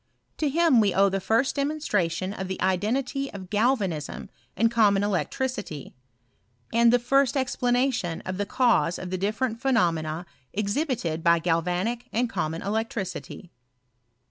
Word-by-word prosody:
To 300 - 0
him 320 -4 +4
we 205 -3 +2
owe 195 +1 +5
the 195 0 -1
first 225 +7 +1
demonstra 280 - 0
tion 185 +4 -4
of 190 -3 -5
the 190 - -4
identity 245 +9 0
of 190 -1 -9
galvanism 205 - -1 0.3
and 230 +3 +3
common 205 -4 +3
elec 205 -3 0
tricity; 210 - -4 0.8
and 235 0 +5
the 245 - +5
first 270 +3 +2
explanation 245 -7 0
of 185 0 -5
the 205 - -1
cause 205 - +2
of 185 -1 -7
the 185 - -1
different 220 +4 -1
phenomena 170 -10 +1 0.3
exhibited 210 - -1
by 170 0 +5
galvanic 180 +8 -1
and 235 +1 0
com 160 -4 -2
mon 165 - -6
electricity. 200 -3 -4
210 Hz, 145 wpm, -26 LUFS, 180-245 Hz, 0.8 s, owe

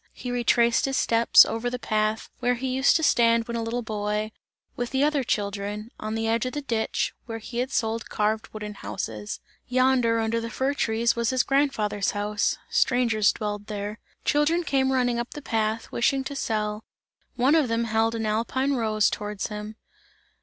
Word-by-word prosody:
He 250 - -6
retraced 235 -1 +3
his 270 -1 -1
steps, 230 0 +6
over 230 +2 -2
the 250 - -3
path, 215 -2 -1
where 245 0 +1
he 260 +2 -3
used 265 +1 +4
to 320 - +2
stand 230 -4 +3
when 235 - -4
a 230 - -1
little 235 +2 -2
boy, 210 0 -2 0.4
with 245 -1 -3
the 265 +1 +1
other 295 -2 +2
children, 205 0 -3
on 215 +1 -3
the 225 0 -1
edge 230 +2 +1
of 255 - -5
the 295 - -3
ditch, 230 -4 -1
and - - -43
where 225 - -3
he 235 +2 -3
sold 225 -4 -2
carved 215 +1 0
wooden 210 -1 -6
houses. 105 - -5 0.3
Yonder, 255 -2 +3
under 225 +1 0
the 230 - -4
fir 265 +4 -1
trees 230 -3 +1
was 235 -1 0
his 255 -2 +2
grandfather's 225 -8 +1
house, 205 0 0
strangers 245 - +3
dwelled 210 -1 -4
there. 210 0 -5 0.3
Children 310 +4 +2
came 265 -3 +1
running 245 -2 +1
up 240 - -5
the - - -5
path, 220 -1 -1
wishing 265 +3 +1
to 280 +1 -6
sell; 215 -4 -2 0.5
one 260 +4 +3
of 315 -5 +4
them 230 0 0
held 225 0 +1
an 225 -1 -2
alpine 235 +6 0
rose 215 -4 +2
towards 210 -1 -3
him. 210 0 -6
230 Hz, 185 wpm, -25 LUFS, 215-255 Hz, 0.5 s, steps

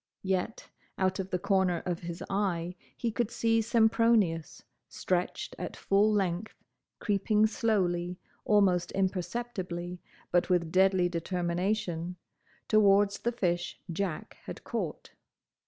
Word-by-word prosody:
Yet 190 +3 -2 0.3
out 190 0 +1
of 190 0 -3
the 180 - 0
corner 190 -2 +1
of 175 -1 -2
his 170 0 -6
eye 180 -3 -1 0.2
he 235 - -1
could 220 +1 -1
see 225 -1 +2
Sempronius, 220 - +2 0.3
stretched 180 -1 -2
at - - -5
full 205 +2 +3
length, 195 0 -1 0.4
creeping 210 +1 +2
slowly, 180 -5 0 0.3
almost 195 -4 +3
imperceptibly, 185 -2 -3 0.3
but 175 +1 +2
with 170 -3 +1
deadly 190 -1 +4
determination, 175 0 -2 0.5
towards 200 -1 +4
the 235 - 0
fish 175 -6 -1
Jack 180 -2 -3
had - - -8
caught. - - -4
190 Hz, 115 wpm, -30 LUFS, 175-210 Hz, 0.5 s, deadly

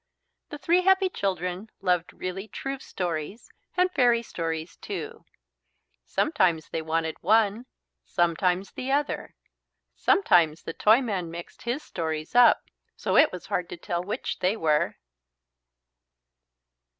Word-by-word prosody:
The 295 - -6
three 340 +5 +3
happy 380 +1 +4
children 185 - -3
loved 180 -3 0
really 190 +3 -5
true 270 +4 -5
stories 175 - -5 0.3
and 365 0 +3
fairy 240 -6 +3
stories 165 -4 -4
too. - - -6 0.8
Sometimes 165 -4 +1
they 165 - -3
wanted 160 0 -2
one, 220 +4 +2 0.4
sometimes 180 +2 0
the 260 +1 -4
other. 290 +1 -1 0.6
Sometimes 170 - +3
the - - -5
Toyman 210 -6 +2
mixed 170 +1 -9
his 245 +6 -3
stories 160 -2 -4
up 245 0 +6 0.3
so - - -1
it - - +6
was 180 - -8
hard 180 -1 -2
to - - -7
tell 175 +1 -3
which 205 - -4
they 190 +5 +1
were. 155 -5 +1
185 Hz, 125 wpm, -26 LUFS, 165-240 Hz, 0.8 s, up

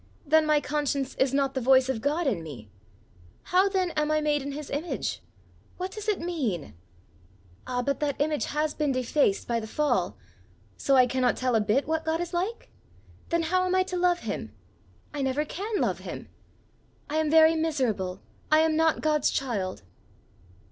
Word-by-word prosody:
Then 310 +1 +4
my 305 -1 +4
conscience 285 -2 -2
is 265 -1 +2
not 275 -1 +1
the 260 - -2
voice 260 +1 +5
of 260 -4 -2
God 300 +6 0
in 210 -11 0
me! 130 -10 -10 0.7
How 375 +2 +3
then 375 -3 0
am 300 -1 0
I 310 0 +2
made 300 -1 +1
in 280 +1 -5
his 295 0 -7
image? 305 +5 -3 0.6
What 370 +1 -4
does 425 0 -7
it 420 -2 +1
mean? 250 - -3 0.9
Ah, 250 -1 -1
but 280 +2 -1
that 290 -2 -1
image 300 0 0
has 300 0 -1
been 300 -2 0
defaced 255 -4 +1
by 235 -1 0
the 220 - -7
fall! 300 +6 0 0.6
So 275 - +2
I 255 -1 +7
cannot 250 0 +1
tell 255 -1 0
a 220 - +3
bit 215 +7 +1
what 320 0 0
God 320 +1 0
is 350 +1 -4
like? 380 +7 -3 0.6
Then 335 0 +1
how 365 +3 +1
am 365 - +1
I 375 - +4
to 370 -1 -5
love 355 0 +2
him? - - -5 0.6
I 290 - -3
never 270 +3 0
can 410 +7 -3
love - - 0
him! - - -8 0.8
I 305 - -2
am 315 -1 +1
very 320 +1 +6
miserable! 245 - -1 0.3
I 310 +1 +6
am 320 -1 +2
not 320 0 +2
God's 305 -2 +2
child!" 205 - -2
295 Hz, 185 wpm, -27 LUFS, 260-320 Hz, 0.9 s, I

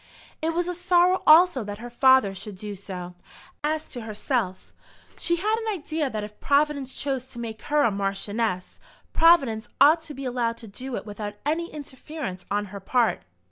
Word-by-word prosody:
It 325 +1 -1
was 350 0 0
a 360 - -1
sorrow 360 +1 +3
also 315 -5 +7
that 205 0 -6
her 240 +2 -9
father 260 -4 +5
should 195 +1 -8
do 210 +1 -6
so. 185 -2 -7 0.5
As 310 +1 -1
to 245 - -8
herself, 215 -2 -3 0.5
she 340 - +1
had 420 +6 +1
an 445 -1 -2
idea 310 -2 -2
that 215 -3 -4
if 210 0 -9
Providence 280 -2 +1
chose 270 -3 -2
to 260 - -13
make 225 -2 -6
her 295 0 +4
a 230 - +3
Marchioness, 195 0 -2 0.3
Providence 275 -10 +4
ought 310 +4 +6
to 305 -2 -10
be 270 +1 -6
allowed 240 -2 -1
to 230 - -10
do 250 +5 -6
it - - -5
without 205 0 -6
any 330 +3 -1
interference 275 - -7
on 205 0 0
her 200 - -5
part. 235 +4 +1
255 Hz, 180 wpm, -25 LUFS, 210-310 Hz, 0.5 s, also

